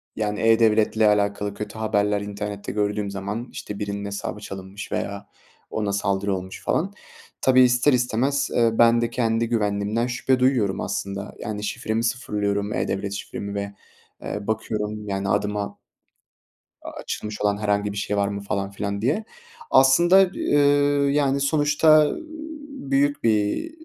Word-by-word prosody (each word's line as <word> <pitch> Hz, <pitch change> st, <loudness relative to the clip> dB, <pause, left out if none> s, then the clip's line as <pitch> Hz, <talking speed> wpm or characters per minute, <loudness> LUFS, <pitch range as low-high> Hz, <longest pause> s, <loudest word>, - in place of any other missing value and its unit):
yani 105 Hz, -1 st, -2 dB
e-Devlet'le 110 Hz, -1 st, +3 dB
alakalı 105 Hz, -1 st, +2 dB
kötü 105 Hz, +2 st, -7 dB
haberler 105 Hz, -1 st, +1 dB
internette 100 Hz, 0 st, -5 dB
gördüğüm 105 Hz, -1 st, -1 dB
zaman 100 Hz, +5 st, -5 dB
işte 105 Hz, -1 st, -7 dB
birinin 100 Hz, -1 st, -3 dB
hesabı 100 Hz, +1 st, -5 dB
çalınmış 95 Hz, -1 st, -8 dB
veya 100 Hz, 0 st, -3 dB, 0.4 s
ona 105 Hz, -2 st, -2 dB
saldırı 100 Hz, 0 st, 0 dB
olmuş 95 Hz, +1 st, -7 dB
falan. 195 Hz, +5 st, 0 dB, 0.5 s
Tabii 130 Hz, -1 st, +5 dB
ister 125 Hz, +3 st, +4 dB
istemez, 125 Hz, +3 st, +1 dB
eee, 115 Hz, -1 st, +4 dB
ben 115 Hz, +1 st, +5 dB
de 120 Hz, -, 0 dB
kendi 115 Hz, -1 st, 0 dB
güvenliğimden 105 Hz, +1 st, 0 dB
şüphe 125 Hz, +1 st, 0 dB
duyuyorum 125 Hz, -7 st, +2 dB
aslında. 100 Hz, 0 st, -4 dB
Yani 105 Hz, -1 st, -5 dB
şifremi 110 Hz, +2 st, -2 dB
sıfırlıyorum, 105 Hz, -4 st, -1 dB
e-Devlet 100 Hz, 0 st, -2 dB
şifremi 100 Hz, 0 st, -6 dB
ve, 100 Hz, 0 st, -4 dB, 0.5 s
eee, 105 Hz, 0 st, -5 dB
bakıyorum 105 Hz, -1 st, -3 dB
yani 95 Hz, 0 st, -2 dB
adıma 105 Hz, 0 st, -1 dB, 1.0 s
a -, -, -7 dB
açılmış 105 Hz, -1 st, -6 dB
olan 105 Hz, -1 st, +2 dB
herhangi 105 Hz, -1 st, 0 dB
bir 100 Hz, -, -7 dB
şey 105 Hz, 0 st, -1 dB
var 100 Hz, 0 st, +2 dB
mı 100 Hz, 0 st, -4 dB
falan 100 Hz, 0 st, -3 dB
filan 100 Hz, 0 st, -3 dB
diye. 150 Hz, -, 0 dB, 0.5 s
Aslında, 170 Hz, +8 st, +6 dB
eee, 145 Hz, -, +1 dB, 0.5 s
yani 140 Hz, -1 st, +2 dB
sonuçta 150 Hz, +1 st, +4 dB, 0.6 s
büyük 145 Hz, -, 0 dB
bir, 110 Hz, -, +1 dB
105 Hz, 140 wpm, -23 LUFS, 100-120 Hz, 1.0 s, Aslında